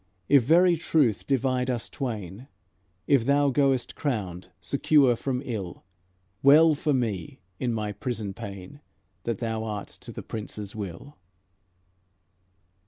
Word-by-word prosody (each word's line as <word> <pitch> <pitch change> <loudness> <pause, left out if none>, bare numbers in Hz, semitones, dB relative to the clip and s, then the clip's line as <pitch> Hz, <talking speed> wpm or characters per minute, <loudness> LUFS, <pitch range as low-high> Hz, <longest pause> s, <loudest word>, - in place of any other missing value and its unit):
If 140 -2 +6
very 170 +7 +4
truth 145 -9 +1
divide 130 -1 +1
us 120 -2 -2
twain; 110 - -5 0.6
If 140 -5 +4
thou 140 +1 +3
goest 135 -3 +1
crowned, 95 - -3
secure 135 - +3
from 130 +2 -3
ill, 100 -9 -5 0.6
Well 155 +4 +7
for 150 +1 -1
me 110 - -2 0.2
in 125 - 0
my 105 -2 -2
prison 110 -3 -4
pain 100 +9 -9 0.4
That 115 -3 -1
thou 110 0 -3
art 105 -2 -5
to - - -9
the - - -8
Prince's 105 -2 -6
will." 105 - -7
120 Hz, 125 wpm, -26 LUFS, 105-140 Hz, 0.6 s, Well